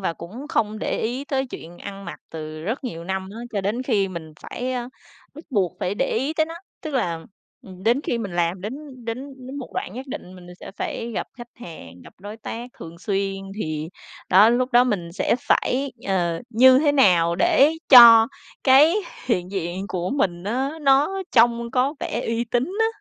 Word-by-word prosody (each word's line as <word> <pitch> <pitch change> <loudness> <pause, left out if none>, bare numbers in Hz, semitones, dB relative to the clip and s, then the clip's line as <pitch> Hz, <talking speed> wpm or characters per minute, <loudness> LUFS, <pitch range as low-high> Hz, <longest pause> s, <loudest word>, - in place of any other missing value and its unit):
và 185 - -1
cũng 215 - -9
không 215 -6 0
để - - -2
ý 250 +5 -2
tới 270 -2 -1
chuyện 175 -7 -10
ăn 200 0 -8
mặc 170 - -8
từ 155 -1 -7
rất 225 - -3
nhiều 170 -9 -5
năm 190 +1 -3
á. 225 - -9
Cho 200 - -1
đến 210 +6 -2
khi 210 -7 +1
mình 165 -3 -8
phải, 255 +1 -4
ơ, 245 -1 -3 0.5
bắt 310 +3 -11
buộc 195 -8 0
phải 190 - -1
để - - 0
ý 270 +6 -1
tới 315 0 +2
nó, 330 - -8 0.3
tức 310 -3 -5
là, 170 -10 -1 0.4
ừm, 185 -1 -12
đến 235 +6 +2
khi 235 - -1
mình 205 -5 -5
làm 175 +1 0
đến 215 +6 -5 0.3
đến 255 +3 -7
đến 275 +2 -7
một 260 - -8
đoạn 190 - -4
nhất 260 +2 -7
định 185 -8 -8
mình 180 -1 -13
sẽ - - -9
phải 235 +2 -4
gặp - - -2
khách 240 - -9
hàng, 155 - -11
gặp - - -14
đối 205 +3 -8
tác 235 +2 -7
thường 165 +1 -10
xuyên 195 0 -1 0.2
thì 155 -5 -3 0.4
đó 195 +4 +7
lúc 250 +2 +1
đó 245 +1 +6
mình 185 -9 -2
sẽ 185 - +1
phải, 265 +2 0
ờ, 175 -4 0
như 255 +3 +7
thế 290 0 +3
nào 175 -11 +4
để 275 - +4 0.2
cho 230 -3 +10 0.4
cái 285 +6 +6 0.3
hiện 180 -7 0
diện 190 0 -4
của 180 0 -3
mình 185 -10 -1
á, 255 +6 -1
nó 290 +8 +3
trông 235 0 +3
có 265 +5 +1
vẻ 230 - -2
uy 230 +1 -1
tín 240 +1 0 0.2
á. 445 - +4
225 Hz, 205 wpm, -23 LUFS, 180-255 Hz, 0.5 s, cho